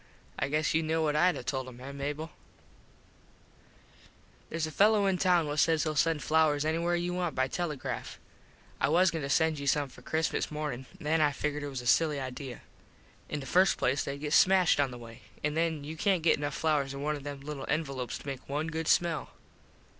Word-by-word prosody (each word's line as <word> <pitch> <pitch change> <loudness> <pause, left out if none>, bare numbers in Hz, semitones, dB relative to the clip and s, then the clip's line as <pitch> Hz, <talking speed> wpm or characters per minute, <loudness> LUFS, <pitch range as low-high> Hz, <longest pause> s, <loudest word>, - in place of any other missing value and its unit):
I 135 - 0
guess 155 +1 0
you 160 - +3
know 160 0 0
what 150 -1 +1
Id 175 +2 +4
a - - -6
told 130 0 -3
him, 125 -1 -11
eh, 135 +2 -7
Mable? 145 +3 -4 2.2
Theres 165 -1 -2
a 155 - -6
fello 205 +4 +4
in 190 -2 +1
town 180 -3 +3
what 150 0 -2
says 160 -1 +3
he'll 155 -1 -2
send 160 0 +1
flowers 155 -2 +2
anywhere 170 +2 +1
you 175 +1 -1
want 180 -3 -2
by 130 0 +1
telegraph. 155 -2 -4 0.6
I - - +2
was 175 +3 +4
goin 160 - -3
to 140 - -4
send 160 +1 +2
you 140 - -5
some 145 0 +2
for - - -15
Christmas 160 0 -1
morning. 150 -4 -4
Then 155 +2 +1
I 150 -1 +4
figgered 150 +1 -3
it 145 - -4
was 135 -2 -5
a - - -11
silly 150 +3 +3
idea. 130 -1 -6 0.7
In 150 - -3
the - - -7
first 185 +8 +3
place 135 +3 +1
theyd 140 +1 -5
get 150 - -2
all - - +9
smashed 185 -5 +4
on 140 -2 +3
the 125 - -8
way. 115 -1 -12 0.2
An 150 0 0
then 160 -2 0
you 155 +2 -6
cant 180 0 +1
get 165 - +4
enough 145 -1 -3
flowers 145 -4 0
in 140 - -5
one 150 +1 0
of 145 - -7
them 140 -1 -6
little 140 -1 -6
envelopes 140 -5 -2
to - - -14
make 135 -2 -6
one 150 +3 -2
good 160 0 -3
smell. 170 -4 +2
150 Hz, 220 wpm, -30 LUFS, 140-160 Hz, 2.2 s, all